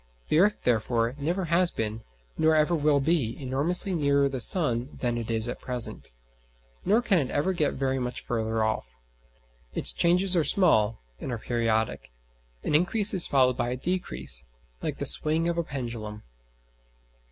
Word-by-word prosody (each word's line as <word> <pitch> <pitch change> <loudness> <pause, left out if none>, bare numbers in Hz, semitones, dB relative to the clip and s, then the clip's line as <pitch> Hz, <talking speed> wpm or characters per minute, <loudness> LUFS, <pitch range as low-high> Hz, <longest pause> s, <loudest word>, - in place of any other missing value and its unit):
The 155 - +3
earth, 210 +3 +2
therefore, 115 0 0
never 175 +6 -2
has 170 +2 +2
been, 110 -3 -4 0.3
nor 160 0 +2
ever 155 +2 +2
will 150 -3 +2
be, 135 -6 -1
enormously 150 +9 -1
nearer 140 -3 +2
the 135 -1 -5
sun 130 -5 0
than 120 -2 -1
it 115 -1 -5
is 115 0 -1
at 120 - -6
present: 125 -2 -3 0.7
nor 225 +4 +2
can 200 -7 +2
it 135 -4 -3
ever 170 +7 -1
get 155 -5 -1
very 135 0 -1
much 125 -1 -5
further 110 -1 -2
off. 85 - -3 0.8
Its - - +10
changes 180 +2 +3
are 165 - +2
small 115 - +2 0.2
and 130 - -6
are 120 - -3
periodic 115 -1 -2 0.5
an - - -2
increase 200 +7 +3
is 185 -3 +2
followed 130 -2 +2
by 120 - -1
a 125 - -3
decrease, 175 - -2 0.4
like - - -4
the - - -4
swing 160 +2 0
of 170 0 -1
a - - 0
pendulum. 115 -7 -7
140 Hz, 165 wpm, -26 LUFS, 120-170 Hz, 0.8 s, Its